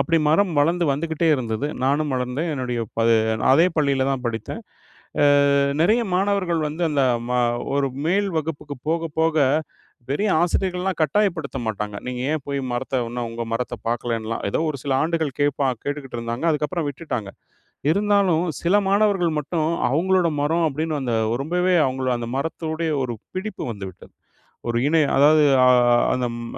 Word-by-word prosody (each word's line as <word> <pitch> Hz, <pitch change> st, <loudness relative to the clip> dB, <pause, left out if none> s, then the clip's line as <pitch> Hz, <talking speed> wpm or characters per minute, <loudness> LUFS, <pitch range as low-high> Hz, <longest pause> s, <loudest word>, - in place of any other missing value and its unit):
அப்படி 165 Hz, +5 st, +2 dB
மரம் 175 Hz, +3 st, +3 dB
வளந்து 170 Hz, +4 st, +2 dB
வந்துகிட்டே 160 Hz, +3 st, -1 dB
இருந்தது, 120 Hz, +1 st, -2 dB, 0.2 s
நானும் 145 Hz, +1 st, +1 dB
வளர்ந்தேன். 125 Hz, +6 st, -2 dB
என்னுடைய 125 Hz, -3 st, -3 dB, 0.2 s
ப -, -, +2 dB, 0.5 s
அதே 165 Hz, +6 st, +5 dB
பள்ளியில 140 Hz, -3 st, +2 dB
தான் 130 Hz, -2 st, -3 dB
படித்தேன். 115 Hz, -2 st, -4 dB, 0.6 s
அ -, -, +5 dB, 0.6 s
நிறைய 215 Hz, +8 st, +4 dB
மாணவர்கள் 185 Hz, -3 st, +1 dB
வந்து 160 Hz, +4 st, -5 dB
அந்த 140 Hz, -2 st, +1 dB, 0.3 s
ம 125 Hz, 0 st, +2 dB, 0.4 s
ஒரு 140 Hz, -1 st, +1 dB, 0.2 s
மேல் 200 Hz, +3 st, +1 dB
வகுப்புக்கு 150 Hz, -2 st, -5 dB
போக, 165 Hz, 0 st, 0 dB
போக 160 Hz, -1 st, +2 dB, 0.7 s
பெரிய 200 Hz, +9 st, 0 dB
ஆசிரியர்கள்லாம் 180 Hz, +1 st, -1 dB
கட்டாயப்படுத்த 160 Hz, -4 st, 0 dB
மாட்டாங்க, 105 Hz, -1 st, -3 dB
நீங்க 125 Hz, -1 st, -4 dB
ஏன் 155 Hz, -3 st, -1 dB
போய் 140 Hz, 0 st, -2 dB
மரத்த 130 Hz, +2 st, -2 dB
இன்னும் 120 Hz, 0 st, -4 dB
உங்க 115 Hz, 0 st, -5 dB
மரத்த 120 Hz, +1 st, -2 dB
பாக்கலைன்லாம். 115 Hz, -1 st, -2 dB
ஏதோ -, -, -1 dB
ஒரு 140 Hz, -, -5 dB
சில 140 Hz, -2 st, -1 dB
ஆண்டுகள் 160 Hz, -4 st, -1 dB
கேட்பா 145 Hz, -1 st, +1 dB, 0.2 s
கேட்டுக்கிட்டு 145 Hz, -4 st, -5 dB
இருந்தாங்க. 115 Hz, +5 st, -4 dB
அதுக்கப்புறம் 155 Hz, +1 st, -1 dB
விட்டுட்டாங்க. 130 Hz, -8 st, -5 dB, 0.6 s
இருந்தாலும் 200 Hz, -3 st, +2 dB, 0.2 s
சில 175 Hz, +4 st, +2 dB
மாணவர்கள் 195 Hz, -4 st, +2 dB
மட்டும் 155 Hz, +2 st, -2 dB, 0.2 s
அவுங்களோட 180 Hz, +4 st, +2 dB
மரம் 165 Hz, +3 st, +1 dB
அப்டின்னு 155 Hz, +2 st, -2 dB
அந்த 120 Hz, -3 st, -2 dB, 0.3 s
ரொம்பவே 180 Hz, +4 st, +1 dB
அவுங்கள் 130 Hz, -1 st, -1 dB
அந்த 115 Hz, -1 st, -5 dB
மரத்தோடைய 160 Hz, +2 st, -2 dB
ஒரு 120 Hz, -2 st, -3 dB, 0.2 s
பிடிப்பு 210 Hz, +3 st, -4 dB
வந்துவிட்டது. 95 Hz, -4 st, -9 dB, 0.6 s
ஒரு 115 Hz, -, 0 dB
இணை, 160 Hz, +1 st, +3 dB, 0.2 s
அதாவது 150 Hz, +2 st, +6 dB, 0.2 s
அ -, -, +7 dB, 0.4 s
அந்த 125 Hz, -1 st, 0 dB
ம 120 Hz, -, -6 dB
150 Hz, 150 wpm, -22 LUFS, 130-170 Hz, 0.7 s, அ